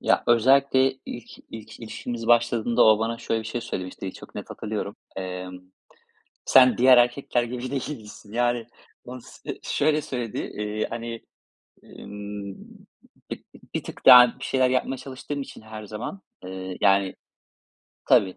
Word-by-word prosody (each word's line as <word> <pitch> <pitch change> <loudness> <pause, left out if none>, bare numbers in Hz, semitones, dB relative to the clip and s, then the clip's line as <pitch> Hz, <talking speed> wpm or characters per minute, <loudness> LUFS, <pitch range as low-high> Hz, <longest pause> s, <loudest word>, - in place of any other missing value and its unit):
Ya, - - +2
özellikle 130 +3 +4
ilk, 120 - -8 0.2
ilk 110 +1 -10
ilişkimiz 115 +1 -6
başladığında 120 0 +3
o 110 -1 +6
bana 115 +1 -2
şöyle 115 - -1
bir 110 - -8
şey 120 +2 -3
söylemişti, 95 -2 -5
çok - - -13
net - - -7
hatırlıyorum. 105 0 -5 0.2
Emm, 90 -1 -6 0.9
"Sen 130 -1 +6
diğer 130 0 +7
erkekler 120 0 +2
gibi 125 +2 -5
değilsin." 110 -6 -6
Yani, 120 -1 +1 0.4
onu 125 +1 -8
s - - -9
şöyle 150 +1 +1
söyledi. 120 -5 -5 0.2
İii, 105 +1 -2
hani, 115 0 -5 0.6
ımm, 100 -1 -8 0.8
b - - -3 0.4
bir - - -1
tık - - -10
daha 125 -1 +9
bir - - -7
şeyler 130 -1 +2
yapmaya 130 +1 0
çalıştığım 140 +2 -6
için 110 - -11
her 110 -1 -9
zaman, 110 - -6 0.2
ııı, 95 0 -6
yani, 95 0 +3 0.9
tabii 95 -1 +4
115 Hz, 140 wpm, -25 LUFS, 105-125 Hz, 0.9 s, daha